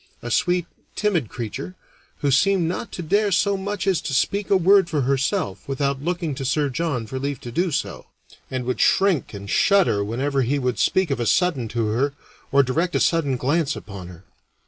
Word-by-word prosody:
A 120 - -5
sweet, 175 +6 +1 0.3
timid 175 - 0
creature, 130 - -6 0.5
who 145 - +1
seemed 180 +5 +3
not 180 +7 -4
to 175 - -5
dare 205 +5 +2
so 200 +2 +2
much 195 0 -3
as 190 -4 +2
to 140 - -3
speak 200 +8 0
a 195 - +5
word 190 0 +4
for 150 -4 0
herself 130 -7 -1
without 140 0 -1
looking 170 -2 -2
to 135 - -5
Sir 145 +2 +1
John 140 -4 -2
for 130 +4 -5
leave 140 -1 -3
to 120 - -7
do 175 +9 0
so, 150 - -3 0.4
and 130 -1 -3
would 125 - -1
shrink 190 -7 +3
and 100 0 -8
shudder 185 - +3
whenever 135 +6 -1
he 130 +4 +1
would 125 -3 -1
speak 185 -5 +2
of 135 - -1
a 120 - -1
sudden 165 -10 +2
to 110 -1 -1
her 135 +6 0 0.4
or 140 0 +5
direct 165 +7 -1
a - - +3
sudden 145 -6 +1
glance 145 +3 0
upon 100 -3 -9
her. 90 +1 -13
140 Hz, 200 wpm, -23 LUFS, 125-180 Hz, 0.5 s, a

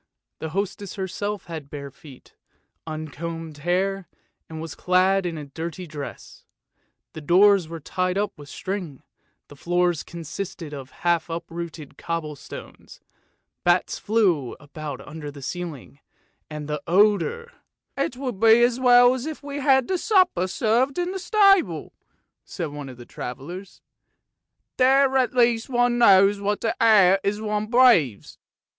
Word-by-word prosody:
The 160 - -4
hostess 195 +2 -4
herself 205 +1 -4
had 160 -5 -8
bare 140 -1 -7
feet, 135 -1 -16 0.5
uncombed 155 0 -6
hair, 185 +4 -1 0.4
and 160 -1 -7
was 160 -1 -6
clad 185 +1 +2
in 165 -2 -4
a 150 - -6
dirty 165 +5 -6
blouse. 150 -4 -9 0.7
The 155 - -8
doors 185 +3 +5
were 165 0 -7
tied 185 +4 -2
up 205 +1 -1
with 145 -1 -13
string, 185 -8 -5 0.4
the 145 - -14
floors 175 +1 0
consisted 170 0 -7
of 135 -2 -8 0.2
half 170 -1 +2
uprooted 165 -2 -7
cobble 165 -3 -4
stones, 140 - -12 0.6
bats 175 +1 +1
flew 185 - +1
about 145 -2 -8
under 150 -1 -7
the 140 -1 -11
ceiling, 160 -4 -6 0.5
and 150 -1 -6
the 150 -1 -3
odour 215 - +2 0.2
" - - -56
It 245 - -7
would 255 -7 -4
be 225 +2 +6
as 240 +1 +2
well 245 -1 +6
if 290 +4 -5
we 285 0 -6
had 265 -2 +3
the 370 -2 -1
supper 365 - +2
served 240 - +1
in 355 0 -1
the 385 - -4
stable," 395 -2 +3 0.5
said 170 -5 -5
one 145 -1 -8
of 125 - -11
the 120 - -11
travellers; 175 +13 -8 0.5
" - - -56
there 265 +1 +4
at 255 -1 +2
least 235 -1 +2
one 245 -1 +2
knows 200 -2 +5
what 205 +1 -1
the 225 - -1
air 195 -4 +6
is 205 +1 -1
one 210 -1 -2
breathes." 225 - +3
185 Hz, 150 wpm, -24 LUFS, 155-230 Hz, 0.7 s, be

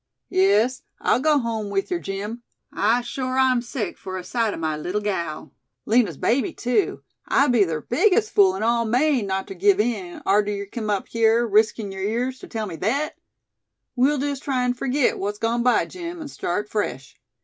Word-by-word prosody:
"Yes, 210 +7 +3 0.2
I'll - - +2
go 300 +2 +3
home 225 -5 -2
with 195 - -2
yer, 355 - 0
Jim! 205 +3 -5 0.3
I 225 +4 +2
shore 255 +1 -3
I'm 260 -2 +3
sick 235 -4 -5
fur 185 -1 -6
a 185 - -6
sight 230 +2 0
o' - - -8
my 160 -1 -1
leetle 180 +7 -3
gal. 170 -7 -3 0.3
Lina's 230 0 +2
baby 270 +8 +1
too 250 +11 0 0.2
I'd 275 -1 +3
be 225 -5 +4
ther 160 -3 -3
biggest 425 - +2
fool 190 -2 +5
in 195 - -3
all 235 +1 +2
Maine, 250 0 +2
not 190 0 -2
ter - - -6
give 195 +2 +3
in, 210 -6 -2
arter 205 +1 +3
yer 200 0 -4
kim 215 +1 -5
up 200 -2 -1
hyar, 230 +1 +3
riskin' 215 -1 +2
yer 195 - -7
ears 245 +6 -1
ter - - -10
tell 220 -2 -3
me 175 -5 -7
thet! 275 - -1 0.8
We'll 270 +4 +3
jest 280 0 -2
try 260 -4 -1
an' 250 0 +1
furgit 255 +2 0
what's 205 +1 -2
gone 230 +2 0
by, 245 0 +3
Jim, 345 -1 -7
an' 305 -3 -7
start 210 -4 -3
fresh. 135 -12 -4
225 Hz, 195 wpm, -23 LUFS, 200-255 Hz, 0.8 s, fool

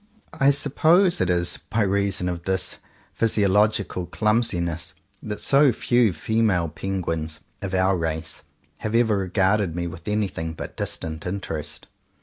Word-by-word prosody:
I 140 -2 +3
suppose 160 - +3
it 90 - +1
is 85 -1 0
by 110 - +1
reason 100 -2 0
of 90 -1 -3
this 95 -1 -2 0.4
physiolog 105 -1 +3
ical 90 -1 -6
clumsiness 90 -7 0 0.3
that 105 -1 -5
so 140 -1 +4
few 120 -1 +2
female 90 -1 +1
penguins 80 -3 -3
— - - -40
of 95 -1 -3
our 95 +1 +3
race 80 -2 -3 0.2
— - - -38
have 110 +1 -3
ever 115 -2 +4
regarded 95 -1 +1
me 85 0 -2
with 85 +1 -8
anything 95 -6 -1
but - - -7
distant 80 +1 -4
interest. 80 -6 -5
95 Hz, 145 wpm, -24 LUFS, 85-110 Hz, 0.4 s, so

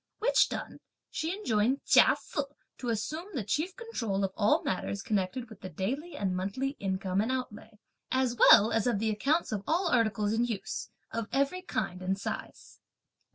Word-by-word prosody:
Which - - +3
done, - - -6 0.3
she 320 - -2
enjoined 245 - +1
Chia - - +6
Se 305 - -3 0.4
to 245 - -3
assume 305 - -2
the 245 - -1
chief 310 - -1
control 230 - -2
of 190 -1 -1
all 210 -1 +3
matters 195 +1 -2
connected 210 +4 -1
with 220 -3 -14
the 185 - -6
daily 260 - -3
and 190 -2 -1
monthly 200 +9 -1
income 190 0 -1
and 225 +4 -1
outlay, 225 -4 -5 0.3
as 260 -2 +1
well 220 -1 +7
as 225 +1 +1
of 240 - +2
the 220 +2 0
accounts 280 +11 +1
of 210 -2 -2
all 345 +3 +2
articles 215 -5 +2
in 230 +2 +2
use 230 -5 -3 0.2
of 230 -1 -3
every 280 +7 +1
kind 190 - -3
and 190 +1 -1
size. - - -6
225 Hz, 175 wpm, -30 LUFS, 200-270 Hz, 0.4 s, well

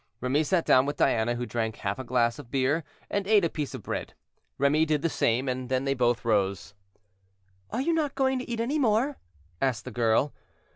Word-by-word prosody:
Remy 130 +5 +1
sat 170 +2 +1
down 130 +2 +5
with 145 - -3
Diana, 120 -2 +2
who 120 +1 -3
drank 115 -2 -2
half 100 +2 -3
a - - -4
glass 120 -2 +1
of 120 - -11
beer, 140 +5 +1 0.3
and 200 -1 -1
ate 210 -4 +5
a - - +1
piece 150 -3 -4
of - - -8
bread. - - -5 0.4
Remy 145 +3 +3
did 150 -2 0
the 165 - +2
same, 125 -1 +1
and 130 -1 -3
then 130 +1 0
they 135 - +2
both 120 -3 +1
rose. 100 -3 0 1.0
"Are 250 - -2
you 335 +5 +1
not 305 -4 0
going 265 -1 +1
to 250 - -7
eat 235 -1 -3
any 265 +7 0
more?" 255 +3 +1 0.4
asked 125 -4 0
the 130 - -6
girl. 120 +4 +2
135 Hz, 210 wpm, -27 LUFS, 120-195 Hz, 1.0 s, down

